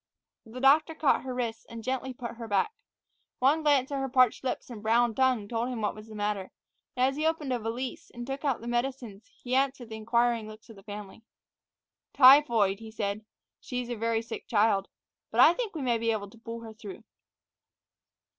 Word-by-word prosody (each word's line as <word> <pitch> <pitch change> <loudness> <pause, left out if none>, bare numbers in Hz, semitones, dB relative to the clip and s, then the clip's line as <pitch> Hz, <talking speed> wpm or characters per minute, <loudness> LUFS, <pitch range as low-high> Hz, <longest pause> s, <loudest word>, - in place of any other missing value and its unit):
The 235 +3 -8
doctor 305 +5 +4
caught 310 -3 +2
her 260 -1 -5
wrists 235 -3 -3
and 230 -1 -9
gently 260 +1 -2
put 240 -2 -7
her 230 -1 -7
back. 215 - +1 0.6
One 280 +5 +3
glance 285 -3 +2
at 280 - -1
her 270 0 -2
parched 255 -2 +3
lips 255 -1 -3
and 220 -3 -8
brown 230 +2 +3
tongue 260 -2 +2
had 205 - -12
told 235 +1 -1
him 250 -2 -4
what 210 - 0
was 215 +1 -12
the 220 - -11
matter, 205 -2 -2 0.5
and 250 - +4
as 270 +1 -2
he 310 +1 +1
opened 305 -5 -1
a 245 - -1
valise 235 +3 -5
and 240 0 -8
took 270 +3 -5
out 275 -6 0
some 235 +1 -5
medicines 240 -4 -3 0.2
he 250 - -4
answered 265 -3 0
the 220 - -6
inquiring 235 0 +1
looks 215 +1 -12
of - - -13
the 195 - -14
family. 205 +1 -9 0.9
"Typhoid," 245 -8 +6
he 225 -1 -9
said. 215 -1 -3 0.4
"She's 250 -1 -5
a 240 - -2
very 230 0 -1
sick 230 - -8
child. 205 -3 +2 0.4
But - - -3
I 330 - +8
think 445 -3 -4
we 300 - -3
may 240 -3 +1
be 230 0 0
able 205 -2 -3
to 230 - -17
pull 230 0 -7
her 225 -1 -9
through." 215 -1 -10
235 Hz, 210 wpm, -28 LUFS, 220-265 Hz, 0.9 s, I